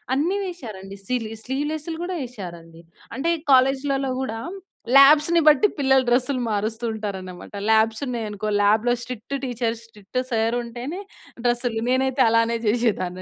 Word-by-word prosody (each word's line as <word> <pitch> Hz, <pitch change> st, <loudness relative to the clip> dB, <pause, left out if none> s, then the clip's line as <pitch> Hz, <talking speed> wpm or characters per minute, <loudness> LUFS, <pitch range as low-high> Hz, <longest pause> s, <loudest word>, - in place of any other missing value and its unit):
అన్ని 345 Hz, +8 st, +1 dB
వేసారండి 215 Hz, -, -8 dB
సిలి 230 Hz, -3 st, -2 dB
స్లీవ్‌లెస్లు 300 Hz, +4 st, -3 dB
గూడా 365 Hz, +1 st, -3 dB
ఏసారండి. 170 Hz, -7 st, -10 dB, 0.3 s
అంటే 320 Hz, +7 st, 0 dB, 0.2 s
కాలేజ్‌లలో 270 Hz, +1 st, +2 dB
గూడా 225 Hz, -3 st, -3 dB, 0.6 s
లాబ్స్‌ని 300 Hz, +4 st, +7 dB
బట్టి 300 Hz, +7 st, +6 dB
పిల్లలు 265 Hz, -2 st, +3 dB
డ్రెస్‌లు 250 Hz, +2 st, +1 dB
మారుస్తూ 220 Hz, +2 st, -2 dB
ఉంటారు 210 Hz, -3 st, -4 dB
అనమాట. 180 Hz, -1 st, -10 dB, 0.2 s
Labs 220 Hz, +1 st, +3 dB
ఉన్నాయనుకో 215 Hz, -4 st, -4 dB, 0.2 s
లాబ్‌లో 220 Hz, +4 st, +3 dB
strict 250 Hz, +2 st, -6 dB
teacher, 235 Hz, -2 st, -2 dB
strict 215 Hz, +2 st, -6 dB
sir 225 Hz, +1 st, +1 dB
ఉంటేనే 245 Hz, +10 st, -6 dB, 0.5 s
డ్రెస్‌లు. 240 Hz, -2 st, 0 dB
నేనైతే 260 Hz, +1 st, +2 dB
అలానే 230 Hz, +1 st, +2 dB
చేసేదాన్ని 210 Hz, -5 st, 0 dB
240 Hz, 125 wpm, -23 LUFS, 220-270 Hz, 0.6 s, లాబ్స్‌ని